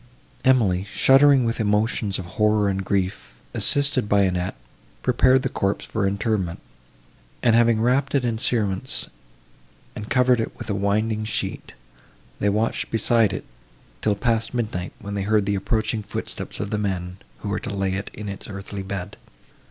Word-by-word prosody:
Emily, 105 -8 +3
shuddering 135 -1 +5
with 115 +1 -1
emotions 105 -1 +1
of 95 - -6 0.2
horror 105 -1 +3
and 95 0 -2
grief, 95 -10 -2 0.2
assisted 140 -6 +3
by 100 -1 +4
Annette, 90 0 -1 0.5
prepared 130 +1 +4
the - - +1
corpse 100 -5 -1
for 105 -3 -1
interment; 100 -3 -1 0.8
and, 115 -2 +5
having 115 -1 +4
wrapt 130 +5 +1
it 135 -3 +2
in 115 -2 -1
cerements, 110 -2 -1 0.9
and 105 0 -7
covered 125 -1 +3
it 115 - -3
with - - -5
a - - +1
winding 105 +2 0
sheet, 110 -1 -4 0.6
they 105 - +2
watched 110 +3 0
beside 115 -1 +3
it, 95 - -5 0.6
till 105 -1 +2
past 115 +2 0
midnight, 105 -7 -2
when 100 0 -7
they 100 - -2
heard 105 0 +2
the 100 - 0
approaching 110 +3 -1
footsteps 105 - -5
of 105 - -3
the 105 - 0
men, 90 -3 -3 0.2
who - - -4
were - - -1
to - - -6
lay 95 -1 -1
it 95 +1 -4
in 105 0 -7
its 100 -1 -6
earthy 100 0 -6
bed. 95 -2 -6
105 Hz, 165 wpm, -23 LUFS, 100-115 Hz, 0.9 s, shuddering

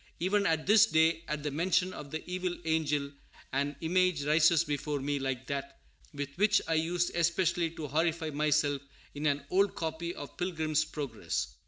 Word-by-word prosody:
Even 200 +3 +2
at 160 -1 +1
this 215 +2 +6
day, 160 -2 +3
at 150 -1 -3
the 150 - -2
mention 180 +4 +1
of 145 - -8
the 160 +2 -6
evil 180 0 -2
angel, 150 -3 0 0.4
an 140 +2 0
image 180 -2 +2
rises 155 +2 +4
before 145 0 -2
me 140 +1 -1
like 135 -1 -3
that 140 0 -4 0.3
with 145 -1 -6
which 205 +1 +4
I 165 - +1
used 175 +2 0
especially 170 0 +1
to 155 - -5
horrify 160 +2 0
myself 150 -1 +1 0.3
in 150 +1 -2
an 140 -1 0
old 195 +1 +3
copy 165 +1 -3
of 145 - -9
Pilgrim's 160 -4 0
Progress. 140 -8 -4
160 Hz, 170 wpm, -30 LUFS, 145-175 Hz, 0.4 s, this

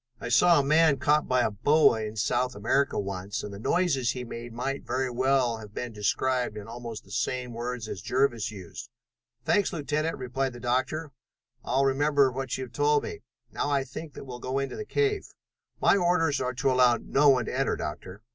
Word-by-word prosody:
I - - -5
saw 165 +7 +5
a - - +2
man 155 0 +4
caught 150 +2 +2
by 125 -1 +2
a 110 - +1
boa 145 +2 +4
in 110 0 -5
South 125 +4 0
America 115 +7 +1
once, 100 0 -4
and 105 - -6
the 100 - -8
noises 135 - +1
he 125 - -5
made 120 0 -7
might 135 +4 -3
very 130 +1 -1
well 130 -1 +2
have 105 -1 -12
been 120 -2 -4
described 120 +2 0
in 105 0 -8
almost 115 -2 -7
the - - -18
same 125 0 -2
words 120 -1 -4
as 95 - -6
Jervis 120 -1 +1
used." 105 +2 -9 0.6
"Thanks, 205 -3 +2
Lieutenant," 155 +1 -2
replied 130 0 -2
the 120 - -9
Doctor. 130 +5 -1 0.5
"I'll 135 +2 +1
remember 140 0 +3
what 130 0 -3
you 130 - -4
have 125 -2 -10
told 145 +3 +2
me. - - -6 0.3
Now - - -2
I 140 -2 +1
think 145 +3 -9
that - - -8
we'll 125 -2 -8
go 130 +2 -3
into 135 0 -2
the 430 - -5
cave." 420 -1 0 0.5
"My - - +4
orders 175 -5 +2
are 125 0 -2
to 130 +2 +1
allow 125 -2 +4
no 145 +1 +3
one 125 -4 +3
to - - -4
enter, 135 +1 +1
Doctor." 90 +7 -7
130 Hz, 205 wpm, -27 LUFS, 115-140 Hz, 0.6 s, saw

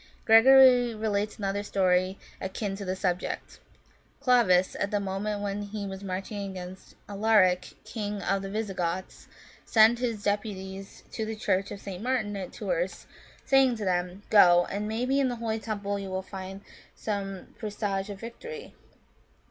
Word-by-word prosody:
" - - -31
Gregory 245 +1 +7
relates 210 -1 -1
another 200 -1 -2
story 185 -1 +1 0.2
akin 195 +1 -3
to 200 - -7
the 185 -1 -2
subject. 180 -1 -3 0.6
Clovis, 195 -8 +4
at 200 - 0
the 205 -1 0
moment 200 +1 -3
when 200 0 -2
he 205 0 -5
was 190 0 -7
marching 195 +1 -4
against 185 0 -9
Alaric, 200 -3 +3
king 210 -2 -4
of 195 0 0
the 195 - -5
Visigoths, 190 -4 -3 0.4
sent 225 +1 +5
his 230 -4 -2
deputies 195 -2 -4
to 220 - -3
the 220 0 -3
Church 195 -2 0
of 200 - -7
St. 190 -2 -7
Martin, 230 -4 -1
at 195 -2 -5
Tours, - - -3 0.4
saying 270 -2 +4
to 215 -2 -4
them, 180 +1 -1
" - - -30
Go, 175 -4 +7
and 205 +2 -2
maybe, 250 +5 0
in 270 -2 +2
the 245 - -3
holy 225 -1 -2
temple 205 -2 -3
you 195 -1 -6
will 190 0 -3
find 190 0 -8 0.3
some 195 -3 -5
presage 205 -2 -3
of 200 -1 -7
victory." 450 - -8
205 Hz, 160 wpm, -28 LUFS, 190-220 Hz, 0.6 s, Gregory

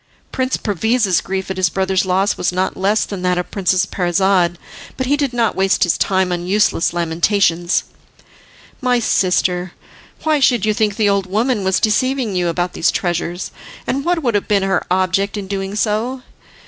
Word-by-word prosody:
Prince 260 0 -1
Perviz's 210 -1 +1
grief 190 0 -4
at 190 - -4
his 185 -2 +2
brother's 190 0 0
loss 190 +2 +1
was - - -1
not 185 +1 -1
less 200 +3 +1
than 200 -3 -6
that 180 0 +1
of 180 - -3
Princess 185 -1 +1
Parizade, 180 -1 +1 0.4
but 260 - -1
he 280 +3 +2
did 285 -3 -1
not 235 -3 0
waste 195 0 +2
his 175 - +2
time 190 -1 +1
on 175 0 -3
useless 195 -3 +2
lamentations. 170 +1 +1 1.0
"My 250 -1 +2
sister," 180 -5 +1
he 185 - -10
said, - - -25
"why 310 -2 +3
should 245 -6 +3
you 215 - +2
think 210 -2 0
the 215 -1 +1
old 200 -2 0
woman 215 +2 0
was 190 0 +1
deceiving 235 0 0
you 180 -1 +1
about 175 +1 -1
these 165 - +1
treasures, 175 0 -2 0.3
and 275 +1 -1
what 345 -1 0
would 240 -3 +1
have 205 - 0
been 200 -2 +2
her 195 -2 0
object 190 +3 0
in 200 - -4
doing 195 0 -4
so! 225 +5 -1
195 Hz, 185 wpm, -18 LUFS, 180-220 Hz, 1.0 s, why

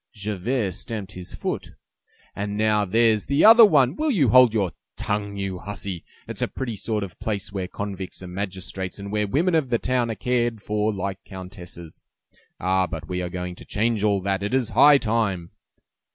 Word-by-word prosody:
Javert 105 +1 -2
stamped 105 0 -6
his 90 -2 -8
foot. - - -4 0.6
"And 100 0 -3
now 105 -1 +2
there's 110 +1 +2
the 140 +6 +3
other 230 +1 +10
one! 145 - +5
Will 310 +6 0
you 165 - +3
hold 125 +1 +7
your 100 -5 0 0.3
tongue, 100 -1 -2
you 95 -2 -3
hussy? 100 -3 -5 0.2
It's - - -6
a - - +1
pretty 120 -4 -4
sort 105 +1 -2
of 95 - -6
a - - -27
place 105 -3 -3
where 95 -2 -3
convicts 95 -1 -6
are - - -7
magistrates, 95 0 -5
and 100 0 -7
where 105 0 0
women 165 - +1
of 155 -5 +2
the 120 - +2
town 125 -1 0
are 115 - -2
cared 120 +1 0
for 105 +1 0
like 95 -1 -4
countesses! 90 -3 -10 0.6
Ah! 95 +1 +1
But 80 -3 -6
we 90 -1 -2
are 90 - -3
going 90 0 -5
to - - -11
change 110 0 0
all 100 -2 +2
that; 95 0 -1
it 105 +5 -1
is 125 -4 +1
high 145 -1 +7
time!" 105 -8 -1
105 Hz, 195 wpm, -24 LUFS, 95-115 Hz, 0.6 s, other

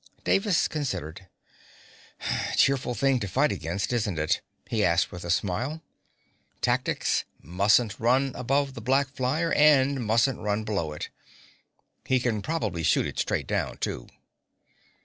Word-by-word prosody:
Davis 195 -3 +2
considered: 95 - -4 1.3
"Cheerful 135 -3 +2
thing 135 +3 +2
to 100 - -3
fight 90 - +2
against, 95 +9 -3
isn't 105 -7 -1
it?" 75 0 0 0.3
he - - 0
asked, - - +2
with 90 - -8
a 85 - -6
smile. 115 - -1 0.8
"Tactics, - - 0 0.2
mustn't 100 - +2
run 130 +4 +2
above 135 +2 0
the 115 - -8
black 135 +4 +2
flyer 140 +6 -1
and 140 -3 +4
mustn't 115 +3 +2
run 105 +1 -1
below 100 -8 -2
it. 75 - -6 0.9
He 130 -1 +2
can 115 -4 -1
probably 110 - -2
shoot - - +2
it - - -5
straight - - -1
down, - - -2
too." - - -4
120 Hz, 135 wpm, -27 LUFS, 100-135 Hz, 1.3 s, and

